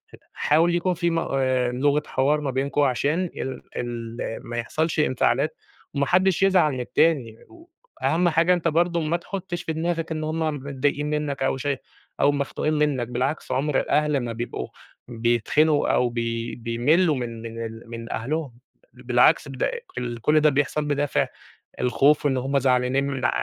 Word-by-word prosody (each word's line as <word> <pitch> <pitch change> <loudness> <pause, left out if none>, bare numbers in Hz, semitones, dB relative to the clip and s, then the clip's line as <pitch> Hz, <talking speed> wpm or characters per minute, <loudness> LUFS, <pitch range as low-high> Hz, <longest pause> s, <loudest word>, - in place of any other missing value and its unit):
ه - - -21 0.2
حاول 165 +3 +2
يكون 180 +1 +1
في 170 0 0
مق 165 0 -1
آآ، 130 -2 +1
لغة 145 +4 +1
حوار 145 +3 +1
ما 140 -2 -2
بينكم 140 +3 0
عشان 145 +6 +1
ال 130 - -4 0.2
ال 115 -1 -5 0.3
ما 120 0 -6
يحصلش 155 +8 -1
انفعالات 140 +1 +1 0.4
وما 140 -1 +1
حدّش 185 +3 +3
يزعل 185 -6 +4
من 130 - -4
التاني. 125 -3 +1 0.6
وأهَم 175 +2 +2
حاجة 170 +2 +3
أنت 175 -2 0
برضه 170 +1 +2
ما 160 +2 0
تحُطّش 175 0 -5
في 160 - -3
دماغك 165 0 -2
إن 155 -1 -2
هم 160 +1 -2 0.2
متضايقين 140 +1 -2
منّك 150 -2 -2
أو 135 - +1
شاي 140 0 -2 0.4
أو 145 - +5
مختوقين 145 +2 -1
منّك، 150 -5 +1
بالعكس 130 +5 -2
عُمر 135 +2 +1
الأهل 150 -1 +1
ما 120 -1 -4
بيبقوا 115 - -4 0.4
بيتخنقوا 120 +6 +2
أو 125 - +2
بي 115 -1 -3
بيملّوا 135 +9 +2
من 115 -2 -5
من 115 0 -6
ال 115 +1 -8
من 115 0 -7
أهلهم، 140 +3 -3 0.4
بَل - - -16
بالعكس - - +4
بد - - -4
أق - - +1 0.3
ال 120 -1 -4
كل 150 +5 +4
ده 150 0 +5
بيحصل 145 +1 0
بدافِع 145 -1 0 0.5
الخوف 145 +4 +3
وإن 135 -2 +2
هم 135 +2 0
زعلانين 125 +1 +2
من 135 -2 -3
ع - - +4
140 Hz, 170 wpm, -24 LUFS, 125-155 Hz, 0.6 s, أو